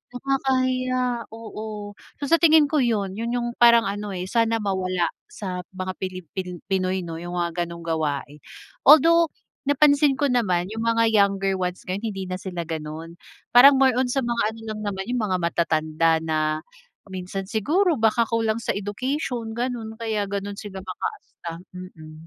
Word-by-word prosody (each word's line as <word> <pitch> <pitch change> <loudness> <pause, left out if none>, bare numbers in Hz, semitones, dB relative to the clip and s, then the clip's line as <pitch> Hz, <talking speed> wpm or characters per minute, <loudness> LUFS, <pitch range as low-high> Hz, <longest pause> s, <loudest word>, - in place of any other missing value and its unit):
nakakahiya, 255 -2 0
oo. 215 -2 -7 0.3
So 280 - -2
sa 335 - +6
tingin 310 -3 +6
ko 305 - +2
'yun, 205 -6 0
'yun 235 +1 -2
'yung 240 -1 -1
parang 235 -1 +7
ano 205 +1 -4
eh, 180 0 -4
sana 230 -1 +2
mawala 185 -3 0 0.2
sa 185 -3 -5
mga 185 0 -4
Pilipin 185 -1 -6
Pinoy 185 -1 0
'no, 165 -2 -6
'yung 175 +1 -7
mga 175 0 -1
gano'ng 170 0 -9
gawain. 150 -3 -2 0.5
Although 330 +3 +7 0.4
napansin 285 0 +4
ko 285 - +3
naman 185 -7 +1
'yung 225 +1 -4
mga 230 0 +3
younger 195 -2 +2
ones 180 0 -3
ngayon, 200 +5 -3
hindi 195 -3 -4
na 185 - -3
sila 185 -3 -5
gano'n, 160 +1 -6 0.3
parang 270 +4 +9
more 260 -2 +4
on 260 - +3
sa 270 +1 0
mga 235 -1 -1
ano 225 - -12
lang 215 0 -4
naman 190 0 -4
'yung 245 -2 0
mga 185 -2 0
matatanda 160 -1 +1
na 160 -1 -1 0.7
minsan 190 +1 -5
siguro 310 - +2
baka 225 +1 +3
kulang 225 0 0
sa - - -1
education 230 +3 -3
gano'n 235 -3 -3
kaya 215 -3 -2
gano'n 200 0 -4
sila 195 -3 -7
makaasta, 175 -1 -7
mm. 170 -4 -10
205 Hz, 160 wpm, -24 LUFS, 180-240 Hz, 0.7 s, parang